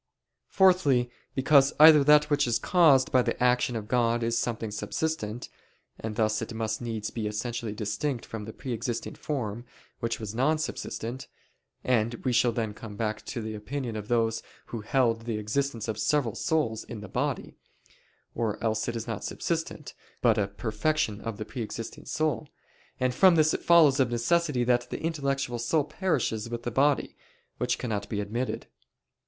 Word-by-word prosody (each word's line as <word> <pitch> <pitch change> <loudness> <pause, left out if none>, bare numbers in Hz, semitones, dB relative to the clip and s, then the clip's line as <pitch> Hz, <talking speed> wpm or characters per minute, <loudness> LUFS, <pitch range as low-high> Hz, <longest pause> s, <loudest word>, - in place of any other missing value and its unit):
Fourthly, 145 -11 +3 0.2
because 135 +1 +5
either 155 -1 +9
that 150 +1 +5
which 145 -2 +3
is 120 - +2
caused 155 -8 +4
by 130 - +5
the - - -1
action 125 0 +2
of 110 -2 -4
God 120 0 +1
is 115 0 0
something 115 -2 -2
subsistent: 120 0 -3 0.5
and 110 -1 -5
thus 110 -1 +1
it - - -5
must 110 0 -2
needs 110 -3 -4
be 110 -3 -3
essentially 115 +1 -3
distinct 115 +5 -2
from 110 -2 -6
the 110 - -7
pre 130 +2 -5
existing 115 +1 -3
form, 120 -6 -4 0.4
which 115 -1 -2
was 110 -2 -5
non 135 +7 +2
subsistent; 130 -4 -5 0.6
and 115 -2 +1
we 125 - +2
shall 120 0 +4
then 110 -2 -2
come 105 -1 -9
back 110 0 -2
to 120 -4 -4
the 110 0 -4
opinion 120 +2 -4
of 105 -1 -5
those 115 -1 +1 0.2
who 115 - -6
held 115 0 +1
the 115 -2 -2
existence 115 +2 -2
of 110 -1 -3
several 120 0 +1
souls 150 -10 0
in 110 -3 -8
the 105 - -8
body - - -2 0.8
or 110 -3 -1
else 110 -1 0
it 120 - -2
is 115 -1 -4
not 115 -5 -4
subsistent, 165 -3 -3 0.3
but 115 -3 +4
a 100 - +1
perfection 110 +3 -1
of 115 -2 -5
the 110 - -5
pre 125 - -6
existing 115 +1 -6
soul: 155 -1 -1 0.5
and 130 -1 +1
from 185 +6 +6
this 155 -1 +4
it - - -2
follows 155 -5 +6
of 130 -2 +3
necessity 130 +3 +1
that 120 0 +1
the - - -4
intellectual 140 -6 -1
soul 145 +6 +1
perishes 140 - -1
with 120 0 -5
the 120 - -3
body, 140 +4 +2 0.4
which 125 0 0
cannot 105 -5 -3
be 105 - -2
admitted. 115 +5 -3
120 Hz, 175 wpm, -28 LUFS, 110-140 Hz, 0.8 s, either